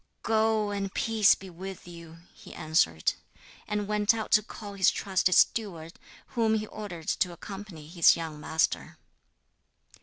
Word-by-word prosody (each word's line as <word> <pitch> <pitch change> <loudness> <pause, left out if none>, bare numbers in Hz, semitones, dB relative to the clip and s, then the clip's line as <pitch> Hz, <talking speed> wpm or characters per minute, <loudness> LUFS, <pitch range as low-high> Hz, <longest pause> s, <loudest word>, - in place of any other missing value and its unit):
'Go, 220 -1 +1
and 200 -1 -3
peace 220 -3 +4
be 195 - -12
with 190 +1 -9
you,' 170 -1 -12
he - - -13
answered; 115 - +1 0.5
and 210 -1 -2
went 210 +2 +2
out 220 -1 -5
to 210 - +6
call 205 -1 -9
his 195 -2 +4
trusted 185 -2 +1
steward, 170 -7 +1 0.4
whom 225 -3 +1
he 215 0 -2
ordered 195 -7 -8
to 180 - 0
accompany 190 -3 -9
his 170 +1 +5
young 160 -2 -6
master. 160 +1 -1
195 Hz, 145 wpm, -28 LUFS, 165-210 Hz, 0.5 s, to